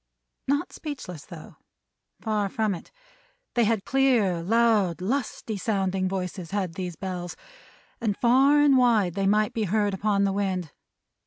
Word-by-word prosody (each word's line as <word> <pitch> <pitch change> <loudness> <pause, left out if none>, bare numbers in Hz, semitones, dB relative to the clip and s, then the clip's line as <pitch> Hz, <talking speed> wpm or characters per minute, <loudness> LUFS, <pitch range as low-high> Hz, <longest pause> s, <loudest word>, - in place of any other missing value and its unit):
Not 285 +2 0
speechless, 220 - -7
though. 170 -4 -12 0.6
Far 210 -3 -1
from 215 0 0
it. 175 - -9 0.6
They 240 -2 +3
had 215 -2 0
clear, 240 -10 +2
loud, 210 -3 +2
lusty, 220 0 -3
sounding 190 -2 -1
voices, 180 -2 -4
had 190 -3 -2
these 180 0 -5
Bells; 180 0 -5 0.7
and 210 -4 -1
far 270 +5 +4
and 285 -2 +5
wide 225 -8 +3
they 195 +1 0
might 210 +1 +2
be 220 -2 -1
heard 205 +1 +1
upon 200 +1 +1
the 195 -1 +1
wind. 190 -5 -2
205 Hz, 145 wpm, -26 LUFS, 185-230 Hz, 0.7 s, and